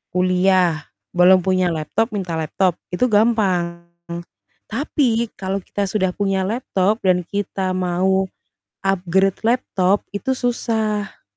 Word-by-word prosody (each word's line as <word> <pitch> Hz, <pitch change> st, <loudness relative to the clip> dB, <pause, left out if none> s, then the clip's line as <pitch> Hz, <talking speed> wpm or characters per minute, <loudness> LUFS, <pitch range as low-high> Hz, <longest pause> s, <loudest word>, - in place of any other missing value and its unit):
kuliah, 180 Hz, -3 st, +2 dB, 0.3 s
belum 180 Hz, +1 st, +5 dB
punya 185 Hz, -1 st, +2 dB
laptop 170 Hz, +9 st, -1 dB
minta 185 Hz, -4 st, -3 dB
laptop, 160 Hz, +3 st, 0 dB, 0.2 s
itu 180 Hz, +8 st, +1 dB
gampang, 195 Hz, -7 st, +1 dB, 0.8 s
tapi 235 Hz, -2 st, 0 dB
kalau 195 Hz, +1 st, -2 dB
kita 200 Hz, +2 st, -3 dB
sudah 190 Hz, -1 st, 0 dB
punya 195 Hz, -1 st, 0 dB
laptop, 210 Hz, -2 st, 0 dB
dan 180 Hz, -1 st, +4 dB
kita 195 Hz, -2 st, -2 dB
mau 185 Hz, +1 st, +1 dB, 0.6 s
upgrade 190 Hz, 0 st, +1 dB
laptop 205 Hz, -5 st, +1 dB
itu 230 Hz, +6 st, -2 dB
susah. 220 Hz, -4 st, -2 dB
190 Hz, 110 wpm, -20 LUFS, 180-215 Hz, 0.8 s, belum